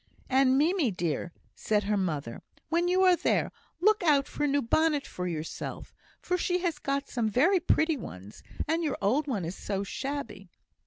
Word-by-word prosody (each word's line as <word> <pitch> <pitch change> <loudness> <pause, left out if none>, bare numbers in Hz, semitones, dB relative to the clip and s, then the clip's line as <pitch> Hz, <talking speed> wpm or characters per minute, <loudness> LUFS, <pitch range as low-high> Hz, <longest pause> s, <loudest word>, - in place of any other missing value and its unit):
"And, 265 0 +4
Mimie, 320 -1 +2
dear," 175 -3 -2 0.2
said 210 -1 0
her 210 +1 0
mother, 155 -11 -2 0.3
"when 340 +2 +1
you 370 +1 +3
are 365 -1 +6
there, - - 0 0.3
look 425 +4 +3
out 290 -5 +3
for 295 - -2
a - - +2
new 285 0 +1
bonnet 300 +4 +2
for 180 0 -5
yourself; 160 -2 -5 0.4
she 360 0 0
has 330 -4 -1
got 275 0 -2
some 230 -4 -1
very 335 - +3
pretty 320 -2 +2
ones, 100 - -10 0.3
and 325 +2 0
your 310 - -1
old 260 +10 +1
one 210 - -2
is 170 - -4
so 200 -1 -3
shabby." 235 -4 -5
275 Hz, 175 wpm, -28 LUFS, 200-320 Hz, 0.4 s, are